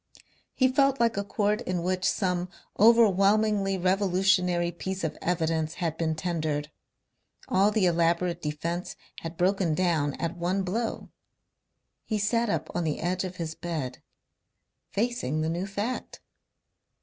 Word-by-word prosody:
He 260 - +4
felt 275 +1 +2
like 230 -1 +2
a 200 - -1
court 205 +2 0
in 180 -6 -2
which 185 +1 -1
some 180 -2 -1 0.3
overwhelmingly 210 -2 +4
revolutionary 185 -2 +2
piece 190 +2 -5
of 160 - -2
evidence 160 -2 0
had 165 -3 -2
been 160 -1 -1
tendered. 155 -3 -2 0.8
All 195 +2 +4
the 210 -2 +2
elaborate 170 0 +1
defence 165 +4 -3 0.2
had 165 0 -7
broken 180 -2 +2
down 155 -5 +1
at 170 0 -3
one 180 +3 -1
blow. 220 +5 -3 0.9
He 215 - -2
sat 230 +3 +1
up - - -1
on 175 - -1
the 155 -2 -1
edge 180 +2 -1
of 185 -1 -5
his 165 -3 -4
bed, 155 -7 -5 0.9
facing 200 - -1
the 160 - 0
new 175 +4 -2
fact. 205 +5 -4
180 Hz, 135 wpm, -27 LUFS, 165-200 Hz, 0.9 s, He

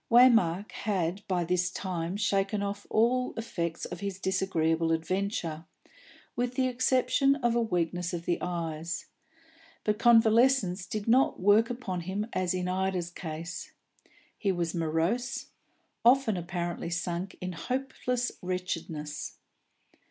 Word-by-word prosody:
Waymark 225 -6 +5
had 190 -2 -1
by 180 -2 +1
this 180 +1 +1
time 180 -1 -3
shaken 200 0 +1
off 200 0 -4
all 250 +3 +2
effects 170 -8 -3
of 175 - -6
his 200 -1 -4
disagreeable 165 -4 +1
adventure, 165 -1 -1 0.7
with 245 +1 -1
the 260 0 +2
exception 255 +2 +3
of 240 -5 +1
a 235 - +2
weakness 175 -4 -1
of 170 -2 -4
the 175 - 0
eyes; 165 -2 -3 0.8
but 210 -1 0
convalescence 225 -5 +4
did 215 0 -4
not 255 +4 +4
work 205 +4 +5
upon 235 -7 -3
him 190 +4 -2
as 185 -1 0
in 180 0 -1
Ida's 185 -1 -1
case. 165 0 -6 0.7
He 200 - +1
was 170 -3 -1
morose, 170 +9 -1 0.5
often 245 -3 +5
apparently 175 -1 -3
sunk 175 +1 -3
in 185 0 -4
hopeless 250 +3 -2
wretchedness. 165 -5 -4
185 Hz, 125 wpm, -29 LUFS, 170-230 Hz, 0.8 s, Waymark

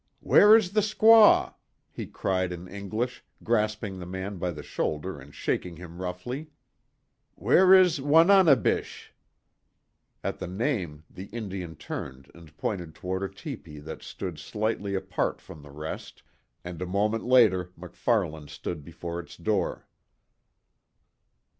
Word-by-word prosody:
"Where 210 +2 +7
is 195 -5 -1
the 215 +1 +3
squaw?" 215 +1 +6 0.4
he - - -6
cried 95 -1 -1
in 90 +1 -7
English, 110 +6 -4 0.2
grasping 105 -3 -1
the 90 - -7
man 95 +1 -5
by 90 0 -1
the 75 -3 -7
shoulder 75 +1 -3
and 70 +1 -13
shaking 85 +4 -3
him 85 +1 -10
roughly, 120 - -5 0.9
"Where 175 - +4
is 180 -6 +4
Wananebish?" 160 - +4 1.1
At - - -3
the 90 - -5
name, 90 - -2
the 95 - -10
Indian 95 -6 -6
turned 65 -2 -7
and 80 -3 -16
pointed 85 -6 -4
toward 95 +3 -4
a 100 - -2
tepee 100 - -9
that 75 +2 -8
stood 90 -5 -6
slightly 105 +4 -2
apart 95 - -2
from 75 - -12
the 75 - -14
rest, 75 +2 -8 0.4
and 90 -1 -7
a 90 - -3
moment 105 +4 0
later 110 -8 +4
MacFarlane 85 -3 -2
stood 75 +2 -6
before 85 +2 -6
its 85 - -10
door. 95 +1 -1
95 Hz, 135 wpm, -27 LUFS, 85-115 Hz, 1.1 s, Where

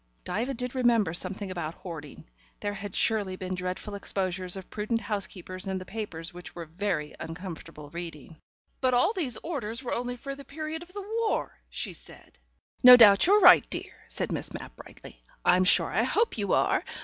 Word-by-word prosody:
Diva 250 +5 -2
did 250 +1 -4
remember 235 -9 +2
something 190 +2 -2
about 170 -3 -4
hoarding; 155 - -9 0.3
there 205 - -2
had 205 -1 -7
surely 205 -4 +2
been 185 0 -5
dreadful 185 +3 -4
exposures 185 -2 -1
of 190 - -9
prudent 215 +2 -1
housekeepers 190 -3 -3
in 190 0 -1
the 185 - -7
papers 180 -6 -6
which 180 0 -10
were 170 -1 -6
very 165 -2 -3
uncomfortable 165 -3 -8
reading. 165 -2 -8 0.4
"But 255 -1 +2
all 345 - +3
these 280 - -2
orders 260 -7 -4
were 245 - -3
only 245 +1 -3
for 275 +3 -6
the 280 0 -10
period 310 +3 -6
of 345 +1 -12
the 400 0 -7
war," 455 -2 -1
she - - -4
said. - - -12 0.4
"No 250 -1 +11
doubt 205 +2 +8
you're 410 +2 +6
right, - - +8
dear," - - -4
said - - -3
Miss - - -2
Mapp - - -9
brightly. - - -13 0.2
"I'm 185 +1 +5
sure 175 -2 +4
I 205 - +2
hope 425 - +1
you 200 -2 0
are. - - +2
200 Hz, 185 wpm, -28 LUFS, 180-250 Hz, 0.4 s, No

